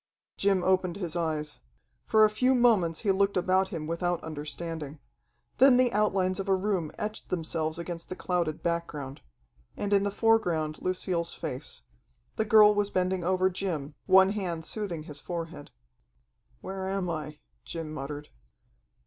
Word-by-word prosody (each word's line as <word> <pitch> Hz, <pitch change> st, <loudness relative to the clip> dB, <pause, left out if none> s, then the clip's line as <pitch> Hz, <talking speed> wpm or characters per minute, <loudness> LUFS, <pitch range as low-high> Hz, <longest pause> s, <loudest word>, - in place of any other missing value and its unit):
Jim 195 Hz, -2 st, +2 dB
opened 185 Hz, -2 st, +2 dB
his 175 Hz, -4 st, -4 dB
eyes. 155 Hz, -3 st, -2 dB, 0.5 s
For 220 Hz, -1 st, +6 dB
a -, -, +3 dB
few 255 Hz, +5 st, +3 dB
moments 210 Hz, -10 st, +3 dB
he 205 Hz, -, +2 dB
looked 195 Hz, +1 st, +2 dB
about 185 Hz, +1 st, +2 dB
him 165 Hz, -6 st, -5 dB
without 170 Hz, +2 st, -1 dB
understanding. 155 Hz, 0 st, -5 dB, 0.6 s
Then 265 Hz, -1 st, +7 dB
the 250 Hz, -1 st, +3 dB
outlines 195 Hz, -3 st, +1 dB
of 195 Hz, 0 st, -3 dB
a 190 Hz, -, +5 dB
room 185 Hz, -5 st, -1 dB
etched 215 Hz, +1 st, -5 dB
themselves 160 Hz, -2 st, -1 dB
against 170 Hz, 0 st, -6 dB
the 185 Hz, -, -4 dB
clouded 175 Hz, -5 st, -2 dB
background. 150 Hz, -5 st, -3 dB, 0.6 s
And 205 Hz, 0 st, -1 dB
in 200 Hz, -, +5 dB
the 200 Hz, -, 0 dB
foreground 180 Hz, -8 st, +1 dB
Lucille's 180 Hz, -2 st, -1 dB
face. 150 Hz, -3 st, -6 dB, 0.5 s
The 220 Hz, -, 0 dB
girl 210 Hz, -1 st, +7 dB
was 205 Hz, -1 st, +1 dB
bending 185 Hz, -1 st, 0 dB
over 185 Hz, +1 st, +2 dB
Jim, 165 Hz, -6 st, -3 dB
one 190 Hz, +1 st, +6 dB
hand 175 Hz, -6 st, -3 dB
soothing 180 Hz, -5 st, -3 dB
his 150 Hz, -2 st, -5 dB
forehead. 165 Hz, -3 st, -6 dB, 0.9 s
"Where 190 Hz, 0 st, -5 dB
am 195 Hz, -1 st, -1 dB
I?" 155 Hz, -3 st, -4 dB, 0.3 s
Jim 165 Hz, -2 st, -6 dB
muttered. 145 Hz, +1 st, -6 dB
180 Hz, 150 wpm, -28 LUFS, 160-195 Hz, 0.9 s, Then